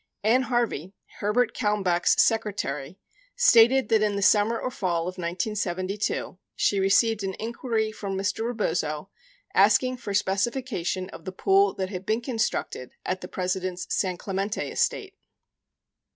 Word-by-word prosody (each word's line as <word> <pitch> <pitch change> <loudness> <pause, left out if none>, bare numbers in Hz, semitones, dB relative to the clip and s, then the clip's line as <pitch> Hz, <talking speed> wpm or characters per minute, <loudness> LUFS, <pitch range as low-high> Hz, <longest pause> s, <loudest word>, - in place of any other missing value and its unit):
Ann 230 +5 +4
Harvey, 220 - -1 0.2
Herbert 225 +3 +1
Kalmbach's 200 -6 +1
secretary, 190 -9 0 0.4
stated 260 - +5
that 220 -2 +4
in 210 -1 +1
the 200 - -1
summer 215 +3 +4
or 255 - -3
fall 175 -7 -1
of 185 +2 -5
1972, 185 +1 -2 0.2
she 200 - +1
received 210 +3 +3
an 190 -1 -3
inquiry 225 -1 -2
from 200 -2 -5
Mr. 200 +3 -1
Rebozo 180 -7 -2 0.4
asking 255 0 +4
for 205 -4 -5
specification 200 -2 -1
of - - -11
the 185 - -4
pool 390 - +3
that 190 -1 -3
had 185 -1 -7
been 220 +2 +1
constructed 225 - -2
at 185 0 -2
the 180 - -6
President's 185 -1 -3
San 185 -3 0
Clemente 195 +2 -3
estate. 390 -2 -1
205 Hz, 135 wpm, -26 LUFS, 185-225 Hz, 0.4 s, stated